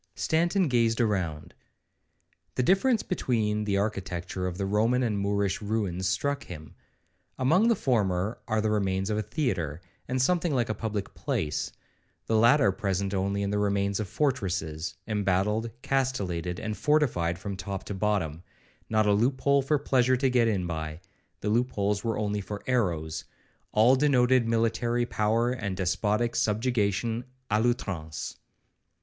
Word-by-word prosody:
Stanton 175 +3 +1
gazed 115 -3 +2
around. 95 -9 -1 1.0
The 125 - +1
difference 215 - +3
between 110 - 0
the 100 -1 +1
architecture 95 -3 -2
of 90 -1 -4
the 100 - -1
Roman 115 +6 +2
and 105 -4 0
Moorish 100 0 0
ruins 100 -4 -1
struck 140 +7 -1
him. 80 -3 -9 0.6
Among 160 - +3
the 235 - +4
former 105 - 0
are 110 -1 +1
the 110 0 0
remains 95 -1 0
of 105 - 0
a - - +1
theatre, 100 - -2 0.3
and 130 +1 -1
something 170 +2 +2
like 120 -3 +1
a - - +1
public 105 -3 -4
place; 75 -1 -2 0.5
the 110 - 0
latter 115 0 +5
present 95 0 -2
only 100 +1 0
the 105 +1 0
remains 100 0 0
of 105 -4 -3
fortresses, 95 - -1
embattled, 105 +2 0
castellated, 95 -11 -1
and 110 -1 -3
fortified 115 - +1
from 100 +2 -5
top 95 +1 -5
to - - -5
bottom,—not 100 +2 -2
a 105 - +4
loop 125 +6 +1
hole 140 0 +4
for 150 +3 +1
pleasure 130 -2 +2
to 130 0 +1
get 120 -2 +3
in 100 -5 0
by,—the 80 +5 -7
loop 120 +4 +2
holes 100 0 0
were 115 -1 -1
only 105 -1 -1
for 100 +2 -7
arrows; 85 -11 -1 0.5
all 115 +5 +5
denoted 130 -3 +3
military 115 +1 +1
power 115 +2 +1
and 100 -7 -3
despotic 105 +5 0
subjugation 110 0 0 0.3
a 105 +1 +3
l'outrance. 95 - -2
105 Hz, 145 wpm, -28 LUFS, 95-125 Hz, 1.0 s, latter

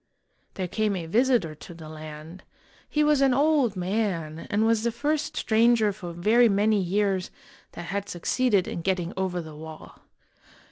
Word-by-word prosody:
There 185 -2 -3
came 210 +2 -1
a 175 -3 -4
visitor 230 -3 +2
to 165 +3 -12
the 160 -2 -10
land. 155 +3 -10 0.5
He 300 - +1
was 295 -2 +3
an 270 -2 +4
old 280 -6 +2
man, 180 -4 -2
and 210 +2 +1
was 225 -1 +2
the 235 +1 0
first 295 +5 -2
stranger 220 -1 +3
for 180 -4 -8
very 220 +8 +4
many 205 +1 +2
years 190 0 0 0.4
that 175 - -7
had 200 0 -3
succeeded 200 +2 +1
in 170 - -4
getting 180 -1 -1
over 185 -2 -2
the 155 -1 -10
wall. 155 0 -11
200 Hz, 160 wpm, -26 LUFS, 175-230 Hz, 0.5 s, an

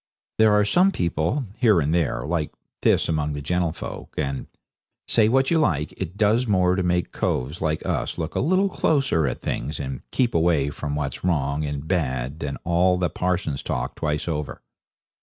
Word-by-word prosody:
There 110 -1 +6
are 105 0 +4
some 180 - +4
people, 85 - 0
here 110 -7 +4
and 75 +1 0
there, 85 -6 0
like 80 -1 -1 0.3
this - - +3
among 75 -2 0
the 70 - -4
gentlefolk, 85 +1 -3
and, 70 -3 -2 0.6
say 110 -2 +4
what 135 +4 +2
you 165 - +4
like, 75 - +1
it 95 +1 -6
does 110 +4 +3
more 90 -3 +3
to 95 - 0
make 90 -1 0
coves 70 +7 -2
like 80 -1 -1
us - - -2
look 80 -1 -3
a - - -1
little 185 +7 +3
closer 135 - +1
at - - -3
things 75 - -3
and 65 -2 -4
keep 125 - +1
away 80 -4 +2
from 75 -1 -4
what's 70 -3 -3
wrong 75 -4 0
and 70 +1 -4
bad 70 -5 -1
than 70 -2 -4
all 90 +2 +3
the 90 -3 0
parsons' 90 -6 -1
talk - - -3
twice 75 +1 -2
over. 75 -3 -4
85 Hz, 180 wpm, -24 LUFS, 75-95 Hz, 0.6 s, There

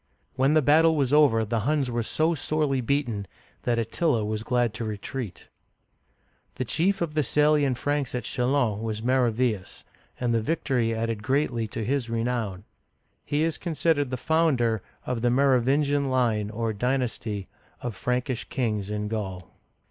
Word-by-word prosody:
When 135 +3 +3
the 155 - +4
battle 160 +3 +5
was 140 -2 +1
over, 135 -7 +5
the 115 +2 -1
Huns 140 +2 0
were 120 0 0
so 155 +8 +1
sorely 150 -3 0
beaten 120 -6 -1 0.4
that 120 -1 +1
Attila 115 +1 0
was 110 0 -2
glad 120 -1 +1
to 110 - -5
retreat. 110 -1 -5 1.1
The 130 - -2
chief 185 - +1
of 160 -3 -4
the 155 - +2
Salian 150 -1 +3
Franks 145 +1 -1
at 125 - -2
Chdlons 125 -4 0
was 110 -1 -3
Mero 125 -1 +3
ve'us, 110 -5 -2 0.4
and 120 -2 0
the 115 - +2
victory 125 -4 0
added 115 -1 -2
greatly 125 -2 0
to 110 +1 -4
his 130 0 -1
renown. 115 -4 -2 0.6
He 145 +2 0
is 165 -1 -1
considered 160 -4 +1
the 130 - -3
founder 125 - +2 0.2
of 125 -3 -2
the 120 - +3
Merovin'gian 140 +2 +2
line, 115 -5 +1
or 110 0 -2
dynasty, 115 -4 -2 0.3
of 120 - -3
Prankish 125 +3 -2
kings 105 -6 -1
in 105 0 -2
Gaul. 95 -4 -5
125 Hz, 155 wpm, -26 LUFS, 110-145 Hz, 1.1 s, battle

